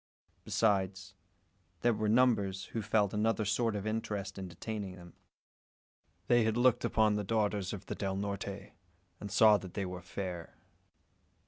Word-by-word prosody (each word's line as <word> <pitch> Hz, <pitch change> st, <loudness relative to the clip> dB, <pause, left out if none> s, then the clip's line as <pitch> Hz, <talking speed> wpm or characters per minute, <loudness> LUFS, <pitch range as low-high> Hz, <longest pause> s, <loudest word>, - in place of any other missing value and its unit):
Besides, 95 Hz, -3 st, 0 dB, 0.7 s
there 120 Hz, -, +3 dB
were 105 Hz, 0 st, -1 dB
numbers 105 Hz, -5 st, +2 dB
who 115 Hz, -, -1 dB
felt 105 Hz, -1 st, +1 dB
another 110 Hz, +1 st, +1 dB
sort 110 Hz, +2 st, +1 dB
of 100 Hz, 0 st, -3 dB
interest 105 Hz, -3 st, -3 dB
in 95 Hz, -, -5 dB
detaining 95 Hz, +2 st, -5 dB
them. 85 Hz, -2 st, -13 dB, 1.1 s
They 120 Hz, +1 st, +4 dB
had 110 Hz, +1 st, +1 dB
looked 125 Hz, -1 st, +4 dB
upon 110 Hz, -1 st, +3 dB
the 105 Hz, -, -1 dB
daughters 105 Hz, -2 st, 0 dB
of 100 Hz, -, -7 dB
the -, -, -4 dB
Del 95 Hz, -1 st, -2 dB
Norte, 100 Hz, 0 st, -4 dB, 0.5 s
and 100 Hz, -, -6 dB
"saw 105 Hz, +1 st, +6 dB
that 95 Hz, -3 st, -10 dB
they 100 Hz, -, -1 dB
were 90 Hz, -1 st, -6 dB
fair." 90 Hz, -7 st, -6 dB
100 Hz, 150 wpm, -32 LUFS, 95-110 Hz, 1.1 s, saw